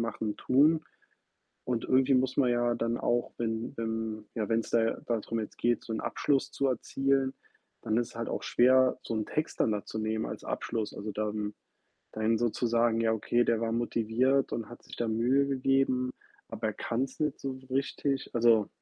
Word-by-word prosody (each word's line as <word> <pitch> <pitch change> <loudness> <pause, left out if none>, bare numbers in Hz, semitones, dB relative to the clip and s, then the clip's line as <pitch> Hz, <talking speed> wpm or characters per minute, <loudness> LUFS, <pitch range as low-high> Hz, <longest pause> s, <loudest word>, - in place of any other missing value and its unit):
machen, 110 -2 -2
tun. 155 +4 +3 0.8
Und 120 -2 -1
irgendwie 130 +1 +4
muss 130 0 +1
man 130 -3 +3
ja 120 0 +2
dann 115 +1 -1
auch, 120 0 0
wenn 115 0 -3
wenn 110 -1 -3
ja, 110 -3 -2
wenn's 115 0 0
da 115 -1 +2
darum 115 -1 -1
jetzt 105 - -7
geht, 120 0 +1
so 115 - -5
'n 110 - -2
Abschluss 140 -2 0
zu 140 - 0
erzielen, 135 +1 +1 0.5
dann 110 - 0
ist 120 -1 +1
es - - -14
halt 115 0 -3
auch - - -3
schwer, 130 +1 +4
so - - -4
'n 110 -1 -1
Text 155 - -3
dann 110 - +3
da 105 - -2
zu 110 - -6
nehmen 110 0 -1
als - - -6
Abschluss. 110 -3 -3
Also 105 +1 -5
dann 105 0 -2 0.6
dann 110 +1 +1
so 120 -1 +2
zu 120 - -1
sagen: 115 0 +2
„Ja 115 -1 +2
okay, 120 +2 +1
der 115 -1 +1
war 115 0 -1
motiviert 120 +3 +1
und 115 - -3
hat 120 - -12
sich - - -11
da 120 - -1
Mühe 125 +5 +2
gegeben, 135 -1 +1 0.4
aber - - -3
er - - -3
kann's 130 +3 -2
nicht 150 -2 -1
so 135 -1 -3 0.2
richtig.“ 135 0 -1
Also 115 -3 +4
120 Hz, 195 wpm, -30 LUFS, 110-130 Hz, 0.8 s, irgendwie